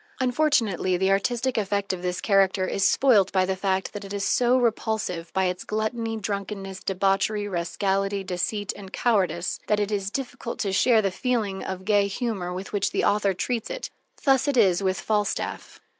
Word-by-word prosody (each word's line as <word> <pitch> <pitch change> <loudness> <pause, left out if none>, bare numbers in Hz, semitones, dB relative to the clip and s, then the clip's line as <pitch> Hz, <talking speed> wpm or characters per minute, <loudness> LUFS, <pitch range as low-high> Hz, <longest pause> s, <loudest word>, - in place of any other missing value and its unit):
Unfortunately, 245 - +1
the 190 +1 +2
artistic 240 +5 +1
effect 200 -1 -1
of 180 - -5
this 180 0 -2
character 195 -2 +3
is 195 - -1
spoilt 215 -8 +4
by 185 -1 +2
the 190 0 -1
fact 190 0 -1
that 205 0 -6
it 195 0 -8
is 200 -1 -2
so 250 0 +3
repulsive 220 -7 -1
by 190 0 +1
its 180 0 -2
gluttony, 225 +1 -2
drunkenness, 195 -2 -4
debauchery, 195 +2 +1
rascality, 195 +2 -1
deceit, 190 +2 -2
and 195 -2 -10
cowardice, 185 -8 0
that 210 - +2
it 205 0 -1
is 195 -2 -1
difficult 245 -1 -5
to 195 -3 -1
share 225 +2 +4
the 195 - +1
feeling 215 -3 -1
of 185 0 -5
gay 205 -1 +3
humor 200 -4 -3
with 185 +3 -6
which 200 -2 +1
the - - -1
author 205 -2 +2
treats 235 +4 -2
it. - - -5 0.3
Thus 270 0 +3
it 280 -3 +1
is 190 -5 +4
with 190 -2 0
Falstaff. 210 -2 -2
200 Hz, 180 wpm, -25 LUFS, 190-220 Hz, 0.3 s, spoilt